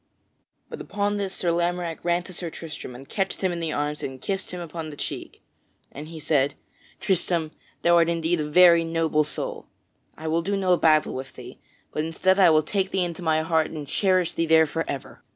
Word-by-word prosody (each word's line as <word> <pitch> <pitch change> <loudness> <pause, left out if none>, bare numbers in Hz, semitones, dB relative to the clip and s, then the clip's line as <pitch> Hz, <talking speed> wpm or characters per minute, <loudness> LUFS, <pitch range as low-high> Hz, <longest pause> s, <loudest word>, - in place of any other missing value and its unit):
But - - -8
upon 205 0 -1
this 200 -2 -2
Sir 175 -2 0
Lamorack 175 -1 -1
ran 175 0 +1
to 185 - -11
Sir 170 -1 -4
Tristram 160 -6 -8
and 135 +2 -11
catched 195 -1 -2
him 185 -2 +1
in 170 -1 -4
his 160 -2 -2
arms 150 +1 -2
and 130 -1 -5
kissed 195 +4 -3
him 180 - -5
upon 165 -2 -6
the 150 - -9
cheek. - - -6 0.5
And 150 +2 -8
he 160 0 -9
said: 145 -2 +1 0.4
"Tristram, 170 -4 0 0.3
thou 170 0 +5
art 170 0 +4
indeed 165 0 0
a 150 -1 -2
very 170 0 +7
noble 165 -2 +1
soul. 150 - -4 0.5
I 160 - -6
will 165 +1 +1
do 200 +4 -1
no 185 -2 +3
battle 155 -2 +3
with 130 +1 -6
thee, - - -11 0.3
but 155 - -1
instead 185 +4 +1
I 185 -3 +7
will 155 -1 +4
take 190 +4 0
thee 190 -2 +1
into 175 0 -4
my 160 -2 +1
heart 160 -1 +1
and 150 -3 -7
cherish 185 +2 +2
thee 165 - -1
there 160 0 +6
forever." 150 -3 -5
165 Hz, 205 wpm, -25 LUFS, 155-180 Hz, 0.5 s, very